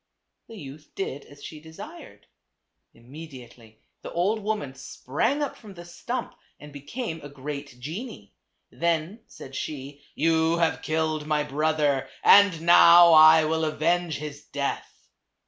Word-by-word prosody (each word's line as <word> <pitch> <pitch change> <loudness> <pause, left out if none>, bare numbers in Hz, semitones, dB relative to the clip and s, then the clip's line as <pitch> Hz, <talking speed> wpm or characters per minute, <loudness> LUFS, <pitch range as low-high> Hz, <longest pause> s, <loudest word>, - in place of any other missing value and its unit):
The 225 - -12
youth 145 -1 -11
did 145 -7 -5
as 145 0 -16
she 155 - -9
desired. 195 - -12 0.7
Immediately 125 -4 -14 0.2
the - - -8
old 195 +6 0
woman 210 -10 -3
sprang 145 - -2
up 285 - -4
from 205 -4 -14
the 175 0 -11
stump 235 +8 -6 0.3
and 150 -1 -13
became 160 - -6
a 145 - -10
great 140 -2 -8
genie. 155 - -8 0.4
Then 170 +5 -2
said 135 - -12
she, 140 0 -7
"You 160 +2 +1
have 165 -1 0
killed 155 -1 -2
my 150 -1 +1
brother, 150 -1 0
and 200 -5 +6
now 170 0 +7
I 155 0 +7
will 160 +1 -1
avenge 160 +1 0
his 150 0 -8
death." 140 0 -5
155 Hz, 135 wpm, -25 LUFS, 145-170 Hz, 0.7 s, now